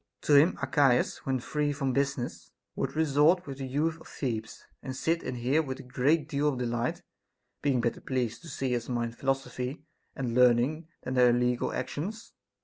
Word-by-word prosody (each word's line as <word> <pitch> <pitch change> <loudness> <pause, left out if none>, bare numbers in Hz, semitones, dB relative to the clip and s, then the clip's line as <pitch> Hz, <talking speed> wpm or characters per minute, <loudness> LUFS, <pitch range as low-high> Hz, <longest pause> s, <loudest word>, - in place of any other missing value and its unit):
To 150 - +2
him 145 +5 +6
Archias, 135 -5 +3
when 130 -1 +1
free 150 +4 -1
from 135 -2 -1
business, 140 -2 -2 0.3
would - - -2
resort 160 +3 +3
with 140 -1 -7
the 135 - -4
youth 155 +5 -1
of - - -13
Thebes, 110 -5 -4 0.2
and 130 - -5
sit 165 +5 0
and 130 -1 -4
hear 130 +6 +2
with 135 -4 -5
a - - -8
great 140 +4 +1
deal 145 0 0
of 135 - -2
delight; 120 0 -2 0.6
being 135 -4 +2
better 120 0 -1
pleased 125 -4 -2
to 170 - -12
see 130 -5 -1
us 120 +1 -4
mind 120 -1 -2
philosophy 135 +1 -2 0.3
and 125 -4 -2
learning 125 +6 +3 0.2
than 130 - -3
their 125 -1 +6
illegal 125 0 +1
actions. 180 - -5
135 Hz, 180 wpm, -29 LUFS, 125-150 Hz, 0.6 s, him